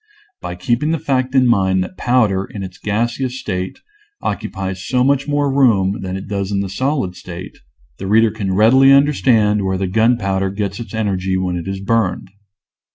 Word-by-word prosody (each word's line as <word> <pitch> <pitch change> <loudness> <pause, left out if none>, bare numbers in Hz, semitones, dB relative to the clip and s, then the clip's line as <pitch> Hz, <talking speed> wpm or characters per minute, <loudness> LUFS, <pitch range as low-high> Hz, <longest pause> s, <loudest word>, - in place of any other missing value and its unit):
By 90 - -5
keeping 120 - 0
the 165 - +1
fact 130 -3 -1
in 130 -1 +5
mind 95 -5 +2
that 95 - -9
powder, 110 -5 +1
in 100 -1 -7
its 95 -1 -9
gaseous 120 +5 -2
state, 95 -4 -4 0.4
occupies 95 -1 -4
so 125 +2 +1
much 140 +1 +1
more 145 -1 0
room 105 -8 +3
than 95 0 -4
it 95 - -8
does 100 -1 -3
in 100 -1 0
the 100 - -4
solid 130 -3 -1
state, 90 0 -9 0.4
the 95 - -5
reader 110 +2 +4
can 100 -3 -3
readily 130 +6 +6
under 140 +2 +5
stand 105 -6 +2
where 95 0 -1
the 95 - -1
gunpowder 95 -1 +1
gets 100 +1 -4
its 115 -1 -7
energy 95 -3 -1
when 90 -1 -1
it 85 +1 -5
is 95 0 -4
burned. 100 -2 -1
105 Hz, 185 wpm, -18 LUFS, 95-125 Hz, 0.4 s, readily